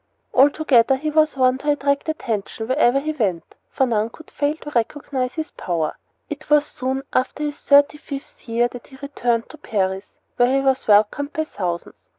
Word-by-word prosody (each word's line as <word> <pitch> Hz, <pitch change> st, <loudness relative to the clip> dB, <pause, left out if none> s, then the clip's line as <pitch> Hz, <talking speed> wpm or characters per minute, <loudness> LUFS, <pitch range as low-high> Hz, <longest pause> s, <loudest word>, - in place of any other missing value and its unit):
Altogether, 270 Hz, -2 st, +4 dB
he 305 Hz, +3 st, -3 dB
was 310 Hz, -2 st, +2 dB
one 255 Hz, 0 st, +3 dB
to 295 Hz, -, -2 dB
attract 280 Hz, +1 st, +1 dB
attention 225 Hz, -7 st, -3 dB
wherever 260 Hz, 0 st, +3 dB
he 310 Hz, +3 st, -2 dB
went, 200 Hz, -, -2 dB, 0.2 s
for 265 Hz, -, +1 dB
none 225 Hz, -2 st, 0 dB
could 315 Hz, +7 st, -15 dB
fail 290 Hz, +1 st, 0 dB
to 295 Hz, -, -8 dB
recognize 255 Hz, +1 st, -2 dB
his 315 Hz, -1 st, -4 dB
power. 165 Hz, -3 st, -2 dB, 0.3 s
It 300 Hz, 0 st, -8 dB
was 295 Hz, -1 st, +5 dB
soon 265 Hz, -1 st, -3 dB
after 255 Hz, +3 st, 0 dB
his 295 Hz, -1 st, -4 dB
thirty 285 Hz, +1 st, +4 dB
fifth 275 Hz, -3 st, -9 dB
year 235 Hz, +1 st, +2 dB
that 245 Hz, 0 st, -11 dB
he 265 Hz, -, -15 dB
returned 245 Hz, -4 st, -1 dB
to 310 Hz, -, -13 dB
Paris, 190 Hz, -2 st, -2 dB, 0.3 s
where 245 Hz, 0 st, +4 dB
he 270 Hz, +1 st, +3 dB
was 265 Hz, 0 st, +1 dB
welcomed 215 Hz, +8 st, +3 dB
by 315 Hz, -, 0 dB
thousands. 180 Hz, -, -4 dB
265 Hz, 180 wpm, -21 LUFS, 230-290 Hz, 0.3 s, was